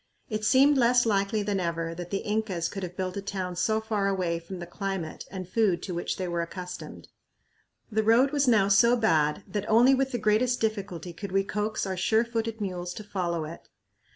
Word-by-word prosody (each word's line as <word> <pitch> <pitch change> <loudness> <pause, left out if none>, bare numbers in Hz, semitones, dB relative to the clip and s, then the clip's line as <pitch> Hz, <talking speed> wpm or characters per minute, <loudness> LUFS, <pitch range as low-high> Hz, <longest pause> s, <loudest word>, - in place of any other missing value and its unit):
It 215 0 -2
seemed 270 +5 +5
less 240 0 +4
likely 205 0 +1
than 200 -1 -1
ever 165 -1 -2
that 175 +1 -7
the 195 - -3
Incas 210 -6 -1
could 195 - -6
have 180 -1 -6
built 185 0 -3
a - - -2
town 190 -2 -4
so 220 +4 +1
far 215 -2 -1
away 180 -4 0
from 170 +3 -8
the 175 - -6
climate 190 -2 -5
and 185 -2 -6
food 190 -4 +1
to 185 - -4
which 175 - -3
they 185 - -3
were 170 -1 -1
accustomed. 180 +1 -7 0.8
The 220 +1 +2
"road" 230 +5 +4
was 285 -2 +1
now 215 -5 +4
so 235 +5 +5
bad 160 -6 +2
that 205 +2 -4
only 240 +5 +6
with 270 0 +1
the 245 - -1
greatest 225 +3 +2
difficulty 195 -6 -3
could 200 +3 -7
we 195 +1 +2
coax 210 +2 -2
our 190 -1 -2
sure 220 +5 +2
footed 225 -1 -3
mules 180 -3 -4
to 215 - -7
follow 175 -5 -2
it. 165 +2 -10
200 Hz, 210 wpm, -27 LUFS, 180-220 Hz, 0.8 s, only